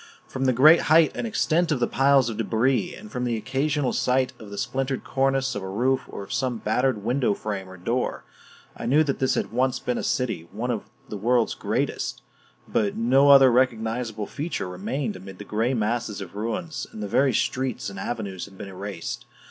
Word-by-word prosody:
From 135 0 -3
the 130 - +4
great 150 +7 +7
height 160 0 +6
and 235 - -3
extent 175 -6 +1
of 145 - +1
the 120 - +3
piles 135 -1 +3
of 115 -2 -4
debris, 120 - +1
and 215 +3 -12
from 125 -3 -3
the 120 -2 0
occasional 135 +3 0
sight 130 0 +1
of 110 - -10
the 100 - -8
splintered 135 +2 -2
cornice 135 0 +1
of 100 - -4
a 95 - -5
roof 125 +7 +1
or 100 - -6
of 100 - -7
some 130 -3 0
battered 110 0 0
window 125 -2 +1
frame 100 -3 -5
or 95 - -11
door, 120 +8 -2 0.5
I - - -5
knew 145 +5 +5
that 140 -3 -2
this 130 - +2
had - - -2
once 125 +2 +1
been 125 0 -2
a - - -4
city, 120 - -1
one 115 +5 -2
of 115 - -4 0.2
the 105 - -5
world's 120 +3 +2
greatest; - - -2 0.4
but 105 -2 0
no 130 +5 +4
other 135 -2 +8
recognizable 115 -3 0
feature 150 - -4
remained 105 +7 -3
amid 95 0 -10
the 105 - -9
gray 115 +6 0
masses 110 -1 -1
of 95 -1 -8
ruins, 115 - -3
and 105 - -7
the - - -3
very 135 +7 +3
streets 125 +1 -1
and 100 - -8
avenues 100 -4 -4
had 95 -1 -15
been 100 - -7
erased. 95 -2 -6
120 Hz, 205 wpm, -25 LUFS, 105-135 Hz, 0.5 s, other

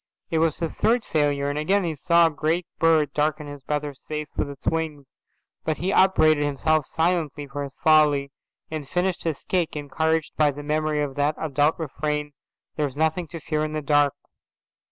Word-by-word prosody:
It 160 - +2
was 160 -1 +2
his 165 -2 -2
third 235 0 +2
failure, 145 -2 +1
and 145 +1 -1
again 195 +6 +2
he 165 -3 -1
saw 170 +4 +4
a 165 - +2
great 160 +4 0
bird 155 -3 +3
darken 150 0 0
his 145 -1 -9
brother's 145 0 -3
face 150 -1 -5
with - - -1
its 140 -1 -11
wings. 160 -3 -1 0.6
But 155 -1 -1
he 185 +3 -1
upbraided 155 -6 +4
himself 145 +1 +1
silently 160 -3 -1
for 145 +1 -5
his 140 -1 -8
folly, 150 -3 +4 0.4
and 150 -3 -5
finished 180 +1 -1
his 160 -4 -2
cake 175 -4 -1
encouraged 160 +2 -1
by 150 -1 +4
the 145 +1 -6
memory 155 0 0
of 140 -2 -4
that 145 +2 +1
adult 150 0 +1
refrain, 150 -1 -3 0.5
"There's 145 -3 -1
nothing 160 +3 0
to 165 +2 -8
fear 155 0 -2
in 155 0 -3
the 155 - -2
dark." 145 -1 +3
155 Hz, 185 wpm, -24 LUFS, 145-160 Hz, 0.6 s, saw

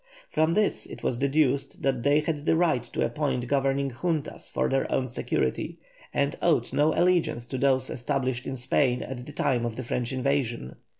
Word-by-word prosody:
From 160 +1 +2
this 210 +1 +1
it - - -10
was 120 - 0
deduced 140 -1 +1
that 130 -3 +1
they 145 +4 +4
had 150 -1 -3
the - - +5
right 160 -7 +3
to - - -1
appoint 125 -1 -1
governing 135 0 +1
Juntas 155 +4 -3
for - - 0
their 135 0 0
own 130 - +1
security, 65 - -1 0.3
and 140 0 0
owed 170 -3 +2
no 150 +2 +4
allegiance 165 -8 +2
to 130 +1 -4
those 130 -1 +3
established 130 0 -2
in 135 - -3
Spain 125 0 +1
at 125 -1 -6
the - - -7
time 130 -4 0
of 120 -2 -2
the 130 - -4
French 120 0 -2
invasion. 130 - -1
135 Hz, 185 wpm, -27 LUFS, 125-150 Hz, 0.3 s, the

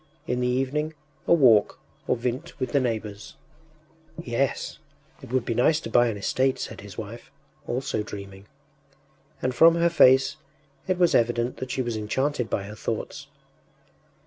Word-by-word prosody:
In 125 0 -1
the 125 - +1
evening 135 +5 -1 0.3
a - - +5
walk 115 -9 +5 0.3
or - - +2
vint 125 +7 -4
with 130 - -2
the 140 - +3
neighbours. 110 -4 -4 0.8
“Yes, 135 -3 -2 0.4
it - - -11
would 130 -2 0
be 115 - -1
nice 125 +7 +3
to 115 - -7
buy 120 +1 +5
an 110 -3 -2
estate,” 130 +6 +1
said - - -6
his 100 -2 -11
wife, 110 +2 -8 0.4
also 125 -2 -2
dreaming, 100 -1 -9 1.0
and 130 - 0
from 165 +5 +6
her 170 0 +3
face 130 -2 +5 0.5
it 185 -1 +1
was 175 -1 +3
evident 120 +1 +1
that 130 - -6
she 130 - -1
was 120 -2 -3
enchanted 125 +3 -1
by 100 - -1
her 100 +2 -8
thoughts. 105 - -5
125 Hz, 160 wpm, -25 LUFS, 110-135 Hz, 1.0 s, from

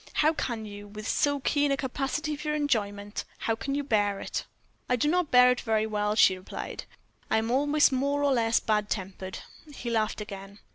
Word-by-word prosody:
How 310 +1 +3
can 235 -7 -3
you, 205 0 -9
with 210 +1 -8
so 285 -1 +1
keen 290 +1 +2
a 275 - +2
capacity 285 +4 -2
for 300 +1 -2
enjoyment 205 -8 -1
how 225 - 0
can 275 +4 -3
you 285 - -1
bear 205 -6 +1
it?" - - -4 0.4
"I 250 - +4
do 250 +4 +1
not 350 0 +1
bear 250 0 +7
it 250 - -1
very 220 -2 +1
well," 210 -1 -1
she 190 -3 +6
replied; 185 0 -7 0.4
"I - - +3
am 225 +1 0
always 290 +3 +4
more 280 +2 0
or 280 -1 +3
less 230 -2 +3
bad 210 -1 0
tempered." 190 -1 -4 0.4
He 240 -2 -4
laughed 220 -1 0
again. 200 -1 -8
230 Hz, 195 wpm, -28 LUFS, 210-285 Hz, 0.4 s, bear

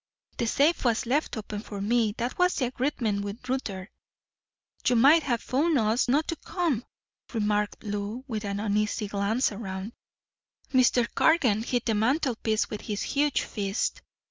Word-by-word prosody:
The 235 - +1
safe 295 +8 +2
was 235 0 +1
left 270 +2 0
open 210 -1 -5
for 205 -1 -7
me. 220 +1 +1
That 245 +6 -3
was 360 0 +3
the 260 - +1
agreement 240 -5 -1
with 205 +5 -7
Rutter." 210 -7 -3 1.0
"You 250 - +4
might 280 +8 +6
have 240 -6 -1
phoned 300 +4 +2
us 225 +2 +2
not 290 +5 +2
to 330 - 0
come," 320 - -1 0.5
remarked 210 -1 0
Lou, 205 +3 -4
with 220 -4 -3
an 200 -1 -3
uneasy 210 0 0
glance 205 +6 0
around. 195 0 -6 0.8
Mr. 250 -2 +4
Cargan 255 -10 +3
hit 245 +1 -1
the 225 - +1
mantelpiece 225 -1 +1
with 210 - -6
his 205 -2 -3
huge 290 0 +1
fist. 200 -1 -2
230 Hz, 155 wpm, -27 LUFS, 210-260 Hz, 1.0 s, might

